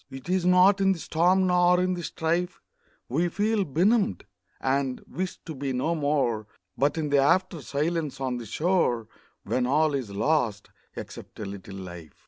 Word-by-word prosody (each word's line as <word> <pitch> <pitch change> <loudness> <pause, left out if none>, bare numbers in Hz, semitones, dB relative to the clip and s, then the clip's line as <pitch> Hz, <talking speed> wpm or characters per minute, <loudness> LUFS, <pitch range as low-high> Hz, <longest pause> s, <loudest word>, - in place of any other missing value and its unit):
It 135 +1 -10
is 185 -1 +1
not 185 +2 +5
in 195 0 +4
the - - -7
storm 180 +4 +2
nor 180 0 +4
in 185 0 +1
the 175 - -4
strife 170 +2 -2 0.5
We 160 +8 +1
feel 210 +3 +1
benumbed, 180 - +1 0.3
and 135 -1 0
wish 185 +1 -4
to 160 - -6
be 135 -1 -3
no 135 +7 0
more, 140 -8 0 0.3
But 145 +3 +1
in 155 -2 -1
the 140 - +5
after 170 +4 +2
silence 150 +1 -2
on 130 -2 -2
the 120 -2 -7
shore, 150 - +1 0.4
When 125 -1 0
all 150 +3 +2
is 130 -6 -2
lost, 110 0 0 0.2
except - - -9
a 105 - -4
little 100 0 -8
life. 85 -5 -9
155 Hz, 170 wpm, -26 LUFS, 130-180 Hz, 0.5 s, not